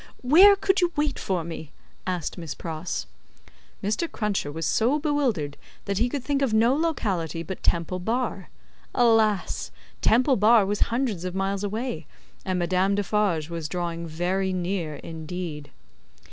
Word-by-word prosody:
"Where 365 +11 +8
could 385 -1 +1
you 350 -1 +2
wait 295 -1 0
for 185 -3 -1
me?" 160 -2 -7 0.4
asked 180 -3 -2
Miss 165 -4 -6
Pross. 165 +1 -4 0.8
Mr. 215 +12 -1
Cruncher 205 -9 -1
was 165 +1 -4
so 240 - +2
bewildered 270 - 0 0.3
that 200 -1 -1
he 240 +2 +2
could 275 0 -3
think 280 0 0
of 250 -6 +2
no 230 +4 +4
locality 195 - -1
but 190 +2 -6
Temple 170 +2 0
Bar. 220 -2 -2 0.5
Alas! 225 -4 +2 0.3
Temple 255 +4 +4
Bar 215 0 +6
was 205 +1 -1
hundreds 230 -7 -1
of 185 0 -4
miles 195 +1 -1
away, 205 - -3 0.4
and 185 -1 -1
Madame 185 +3 +2
Defarge 200 -6 0
was 165 -3 -4
drawing 170 -1 -3
very 180 +4 -1
near 180 -4 -2
indeed. 160 0 -6
195 Hz, 145 wpm, -25 LUFS, 170-240 Hz, 0.8 s, Where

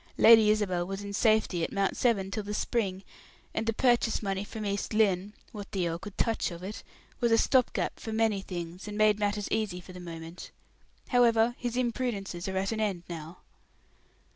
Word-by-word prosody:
"Lady 225 -2 +8
Isabel 185 -5 +1
was 195 +1 -5
in 200 0 -6
safety 215 -5 +2
at - - -2
Mount 195 -1 0
Severn 200 -6 +1
till 215 - -2
the 210 +1 -5
spring, 195 -4 -1 0.5
and 225 - -2
the - - +3
purchase 240 -1 +2
money 195 -1 -1
from 215 +1 -6
East 200 +1 -2
Lynne 200 -2 +2 0.2
what 205 -2 -8
the 185 -3 0
earl 165 0 -3
could 200 +2 -10
touch 225 -1 +1
of 170 0 -9
it 205 +3 -6 0.4
was 235 -2 +2
a 225 - +6
stop 255 +1 +3
gap - - -2
for 220 - -6
many 220 -2 +1
things, 175 0 -6
and 210 0 -5
made 215 -1 +4
matters 205 0 -1
easy 210 -5 -1
for 185 +1 -12
the 180 - -9
moment. 165 0 -8 0.6
However, 235 -2 +4
his 245 0 -3
imprudences 225 -7 -2
are 190 0 -2
at 195 +2 0
an 220 - -2
end 200 -5 -1
now." 165 0 -8
205 Hz, 195 wpm, -29 LUFS, 185-225 Hz, 0.6 s, Lady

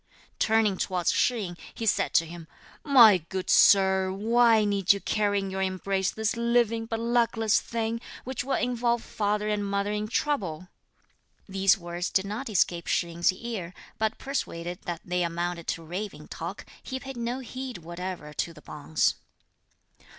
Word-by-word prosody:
Turning 220 -3 +3
towards 180 -2 0
Shih 245 -3 +2
yin, 175 -2 -6 0.2
he 225 - -4
said 220 - +1
to 165 - +5
him: 165 0 -10 0.4
"My 235 -9 +7
good 185 +3 -4
Sir, 190 -1 +5
why 225 +2 +4
need 200 -2 +3
you 200 - -4
carry 205 0 0
in 195 -1 -2
your 190 0 -3
embrace 190 0 0
this 220 0 -1
living 235 -1 +1
but 225 0 -3
luckless 230 -2 +2
thing, 230 0 -3 0.2
which 260 -1 -4
will 270 +1 -1
involve 240 -1 0
father 210 0 -1
and 210 -1 0
mother 200 0 -1
in 210 0 -2
trouble?" 195 - -2 0.8
These 195 -1 +3
words 175 0 -4
did 190 - +1
not 215 +6 -4
escape 175 -4 +1
Shih 170 - +1
yin's 170 +1 +2
ear; 190 -4 -6 0.2
but 220 0 0
persuaded 175 -10 -4
that 170 -1 -4
they 180 0 -1
amounted 170 0 -2
to 165 - -2
raving 185 +6 -6
talk, - - -6 0.2
he 260 -1 -5
paid 270 0 -8
no 240 +1 -2
heed 260 0 -6
whatever 175 -2 -6
to 165 +3 -2
the 150 - -13
bonze. 150 +1 0
200 Hz, 165 wpm, -27 LUFS, 180-230 Hz, 0.8 s, My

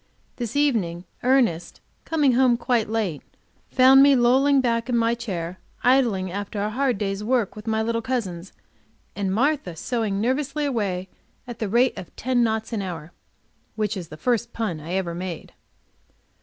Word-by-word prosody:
This 240 -1 -4
evening, 205 -12 0 0.2
Ernest, 245 -10 +1 0.3
coming 300 -4 +2
home 245 -1 +4
quite 235 -3 0
late, 210 -9 -1 0.5
found 265 +1 +7
me 280 0 +7
lolling 265 +3 +4
back 235 -1 0
in 240 - +2
my 230 0 +2
chair, 185 -7 -5 0.2
idling, 235 -8 +2
after 200 +2 -4
a 210 +1 -1
hard 255 0 0
day's 195 0 -3
work 235 -2 0
with 210 +1 -10
my 220 0 +1
little 230 +1 -1
cousins, 195 -8 -3 0.6
and 195 -2 -1
Martha 255 - 0
sewing 215 +1 -2
nervously 270 +6 -1
away 200 -9 -2 0.4
at 240 -2 -8
the 215 - -2
rate 240 +4 +3
of 175 - -11
ten 250 0 0
knots 220 0 -1
an 215 - -1
hour, 170 -4 -6 0.6
which 215 -2 -1
is 180 -4 -6
the 155 - -10
first 235 +3 -1
pun 210 -9 -3
I 160 +4 -6
ever 185 -3 -1
made. 175 -1 -6
225 Hz, 165 wpm, -24 LUFS, 190-250 Hz, 0.6 s, found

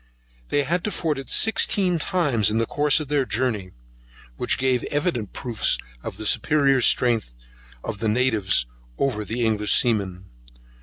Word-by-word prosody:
They 145 - +1
had 170 +5 -1
to - - 0
ford 160 -7 -2
it 135 - -9
sixteen 200 -5 +1
times 145 - +1
in 110 - -1
the 115 - +1
course 145 +5 +2
of 155 - -6
their 145 -1 +1
journey, 115 -6 -2 0.7
which - - 0
gave 130 -2 +1
evident 145 - -2
proofs 120 -4 0 0.2
of - - -7
the - - -6
superior 140 -3 +3
strength 115 - +1 0.5
of 100 - -5
the 110 0 0
natives 105 - +2 0.3
over 120 -6 -1
the 115 +3 -2
English 105 -2 +2
seamen. 100 -6 0
125 Hz, 155 wpm, -23 LUFS, 110-145 Hz, 0.7 s, superior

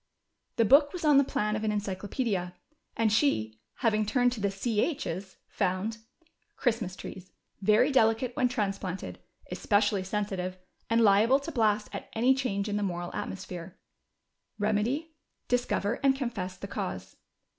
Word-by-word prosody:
The 230 - +3
book 285 +5 +6
was 350 -3 -4
on 295 -2 +7
the - - +5
plan 210 -5 -1
of 215 - -3
an 215 - +1
encycloj)O0dia, 200 -1 -2 0.4
and 220 -2 +2
she, 110 - +1 0.3
having 215 -1 +3
turned 245 +3 +2
to 240 - -5
the 200 - +2
ch's/' 195 - -2
found: 195 +5 -1 0.6
Christmas 225 -7 0
trees 185 -1 -9 0.2
— - - -45
very 245 +7 +4
delicate 230 0 +2
when 255 -4 +3
transplanted, 195 -6 -3 0.3
especially 205 -1 +2
sensitive, 190 -2 -3 0.3
and 230 +1 +3
liable 220 +5 +5
to 330 - -5
blast 215 -5 +2
at - - -6
any 245 +4 +4
change 220 -7 -1
in 210 0 -1
the - - -1
moral 175 -3 -3
atmosphere. 185 -2 -6 0.8
Keniedy: 215 +10 0 0.4
discover 245 -3 0
and 275 -1 +4
confess 215 -9 -4
the 200 - -7
cause." 90 - -5
210 Hz, 145 wpm, -29 LUFS, 190-245 Hz, 0.8 s, on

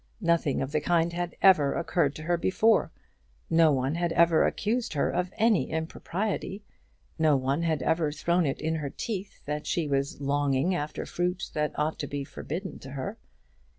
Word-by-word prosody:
Nothing 170 -7 +1
of 135 - -5
the 150 0 0
kind 170 0 +1
had 175 0 -3
ever 155 -8 +6
occurred 165 -3 0
to 155 - -7
her 175 +2 +1
before. 205 +6 +2 0.6
No 165 -1 +5
one 135 +1 0
had 170 0 -1
ever 170 -1 +4
accused 230 +1 -1
her 145 - +1
of 180 +1 -1
any 225 -4 +3
impropriety; 190 +5 -3 0.6
no 155 -2 +4
one 135 +4 0
had 160 -4 0
ever 160 -2 +1
thrown 170 +2 +1
it 135 - -2
in 160 +1 -1
her 145 -3 -3
teeth 200 - -6
that 150 +1 -3
she 165 -3 0
was 140 0 -1
longing 140 +3 +1
after 150 -3 -3
fruit 180 +2 -2
that 150 -1 -1
ought 150 +1 -1
to 145 - -3
be 140 0 -4
forbidden 165 +6 -6
to 135 - -10
her. 200 - -5
160 Hz, 180 wpm, -28 LUFS, 145-180 Hz, 0.6 s, ever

